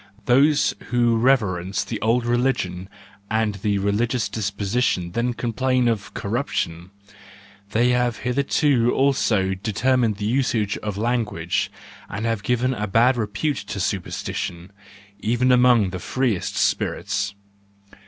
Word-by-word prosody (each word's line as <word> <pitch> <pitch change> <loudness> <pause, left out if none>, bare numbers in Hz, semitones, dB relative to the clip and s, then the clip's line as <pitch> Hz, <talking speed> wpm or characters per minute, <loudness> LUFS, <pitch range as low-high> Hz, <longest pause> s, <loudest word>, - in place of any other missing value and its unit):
Those 140 +4 +4
who 120 -1 +2
reverence 100 -7 +1
the 110 - -5
old 115 +2 +2
religion 120 -7 -1 0.4
and 110 -1 +1
the 100 -1 +1
religious 105 +3 0
disposition 100 -2 -1
then 120 +5 -1
complain 125 +2 0
of 105 -2 -1
corruption,— 95 - -3 0.8
they 120 +4 +2
have 125 -1 +1
hitherto 130 -1 +2
also 115 -8 +2
determined 115 +3 +1
the 105 +1 -4
usage 110 -4 0
of 105 -2 -4
language, 110 -7 -1 0.4
and 105 +3 -4
have 115 -3 -1
given 125 +4 0
a 105 -3 -3
bad 120 +6 +4
repute 115 +6 -1
to 105 - -6
supersti¬ 95 -1 -3
tion, 85 +2 -5 0.5
even 120 +4 +1
among 125 -6 +4
the 90 - -5
freest 120 -2 -1
spirits. 100 0 -1
115 Hz, 125 wpm, -23 LUFS, 100-125 Hz, 0.8 s, Those